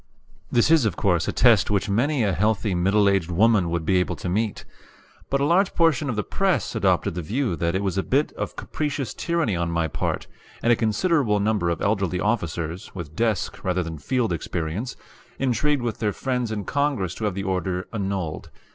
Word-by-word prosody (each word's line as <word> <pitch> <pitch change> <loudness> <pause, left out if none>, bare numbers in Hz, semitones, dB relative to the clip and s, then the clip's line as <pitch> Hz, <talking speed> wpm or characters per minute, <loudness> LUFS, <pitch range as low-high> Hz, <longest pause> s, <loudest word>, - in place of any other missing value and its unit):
This 120 +5 +3
is, 160 -4 +6
of 105 -6 0
course, 90 -5 +1
a - - +1
test 115 -5 +4
which 100 -1 +1
many 125 +6 +1
a 100 -3 +1
healthy 105 +1 +1
middle 100 +4 +3
aged 95 -4 +2
woman 100 0 +3
would 85 -1 -2
be 95 +3 +3
able 90 - 0
to - - -6
meet. 105 +3 -1 0.6
But 140 0 +1
a - - +3
large 180 +5 +2
portion 155 -4 +2
of 120 - -1
the 105 - -1
press 195 -2 0
adopted 100 -3 +1
the 90 - -3
view 110 - -1
that 85 +1 0
it 95 - 0
was 95 -1 0
a - - +3
bit 140 +9 +1
of - - -5
capricious 145 -3 -3
tyranny 170 - 0
on 85 0 -1
my 85 -1 0
part; 75 - -2 0.4
and 120 - +5
a - - +4
considerable 115 - +1
number 100 -4 +1
of 85 - -2
elderly 95 -4 0
officers, 85 -5 -2
with 80 -4 -7
desk 110 -4 -1
rather 90 -1 0
than 80 -2 -6
field 120 - 0
experience, 85 +7 -3 0.4
intrigued 135 +2 +1
with 115 -2 -3
their 105 -2 0
friends 125 -2 -2
in 105 -3 -3
Congress 140 - 0
to 110 - -4
have 100 -3 -1
the 100 - -3
order 95 -1 -2
annulled. 95 -8 -3
105 Hz, 200 wpm, -24 LUFS, 90-120 Hz, 0.6 s, is